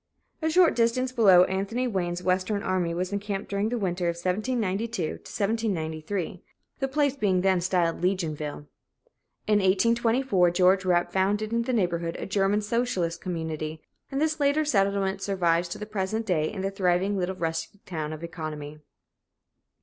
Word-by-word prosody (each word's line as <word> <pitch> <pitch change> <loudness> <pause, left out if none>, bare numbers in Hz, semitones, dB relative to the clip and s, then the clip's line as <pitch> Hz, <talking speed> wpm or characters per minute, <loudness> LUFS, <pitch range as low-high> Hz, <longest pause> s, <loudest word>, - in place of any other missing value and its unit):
A 320 - +1
short 350 +1 +5
distance 245 +2 +1
below, 195 -8 +6
Anthony 200 +7 -1
Wayne's 180 -5 -2
Western 185 +3 0
army 185 -2 0
was 180 +3 -2
encamped 200 0 -3
during 200 +2 0
the 245 - -1
winter 180 -4 -1
of 170 - -2
1792 200 0 -2 0.5
93, 160 +1 -3 0.4
the 270 - 0
place 285 0 +1
being 195 -8 +1
then 190 -1 +2
styled 175 -2 +1
Legionville. 155 -6 -2 0.8
In 210 -1 +3
1824 225 +1 +3
George 185 +2 +3
Rapp 175 -1 +2
founded 205 +3 +1
in 235 - +2
the 235 - -2
neighborhood 170 -7 0
a - - -5
German 195 +2 +1
socialist 205 -7 -1
community, 160 -3 -4 0.3
and 270 - -1
this 310 +1 0
later 290 +2 +2
settlement 195 -5 +1
survives 175 -3 +1
to - - -5
the 210 - -6
present 215 +1 -2
day 155 -6 0
in 205 -3 -5
the 195 - -1
thriving 190 +1 +1
little 190 0 -1
rustic 165 +4 -4
town 155 -4 -4
of 155 +1 -7
Economy. 155 -3 -6
190 Hz, 155 wpm, -26 LUFS, 175-215 Hz, 0.8 s, below